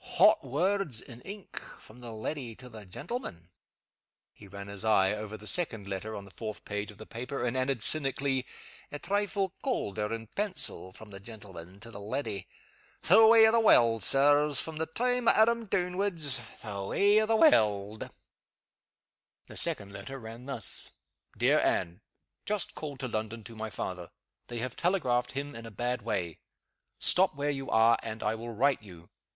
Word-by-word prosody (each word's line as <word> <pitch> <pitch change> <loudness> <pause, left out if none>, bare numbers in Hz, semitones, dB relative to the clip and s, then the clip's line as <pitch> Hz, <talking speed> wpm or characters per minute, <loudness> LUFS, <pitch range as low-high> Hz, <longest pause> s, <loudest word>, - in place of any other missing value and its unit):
"Hot - - +6
words 175 - 0
(in 120 -1 -11
ink) 200 +5 -8 0.2
from 110 +3 -16
the 120 -1 -8
leddy 115 +2 -5
to 125 +1 -12
the 110 -4 -11
gentleman!" 95 - -6 0.8
He 105 - -15
ran 100 0 -9
his 100 0 -6
eye 100 -3 +3
over 105 0 -6
the 105 - -13
second 115 - +2
letter, 100 +3 -5
on 100 - -7
the 100 - -15
fourth 110 0 -7
page 105 0 -4
of 105 - -12
the 110 - -10
paper, 125 +4 -5
and 125 +1 -1
added, 130 -3 0
cynically, 135 -3 +1 0.4
"A 145 - -3
trifle 195 +2 -1
caulder 105 - -2
(in 115 0 -4
pencil) 185 - -1
from 105 +2 -14
the 95 - -8
gentleman 95 -4 -11
to 115 - -9
the 105 - -9
leddy! 105 -2 -4 0.6
The 220 0 +7
way 225 0 +8
o' - - +4
the 230 - +4
warld, 115 - +5
Sirs! 145 +4 +6
From 160 -1 -1
the 160 +1 -2
time 245 +7 0
o' - - +9
Adam 230 +1 +3
downwards, 180 -8 0 0.2
the 100 -3 -5
way 205 - +3
o' 215 - 0
the 225 - +3
warld!" 105 - +3 1.4
The - - -13
second 100 -1 0
letter 135 +6 -8
ran 115 +1 -10
thus: 120 -7 0 0.4
"DEAR - - +4
ANNE, 90 +2 0 0.5
Just 210 -4 -1
called 145 -4 -7
to 130 - -2
London 110 0 -4
to 115 - -11
my 110 0 -5
father. 90 -4 -5 0.4
They 120 - -6
have 125 +2 -4
telegraphed 125 -10 0
him 140 +1 -4
in 115 0 -8
a - - -7
bad 120 +4 -2
way. 85 -5 -3 0.6
Stop 185 -3 +4
where 145 +1 -1
you 135 -1 -5
are, 115 +1 +4
and 110 -1 -6
I 105 - +1
will 115 +1 -7
write 135 +4 +1
you. 90 -5 -14
120 Hz, 180 wpm, -29 LUFS, 105-155 Hz, 1.4 s, o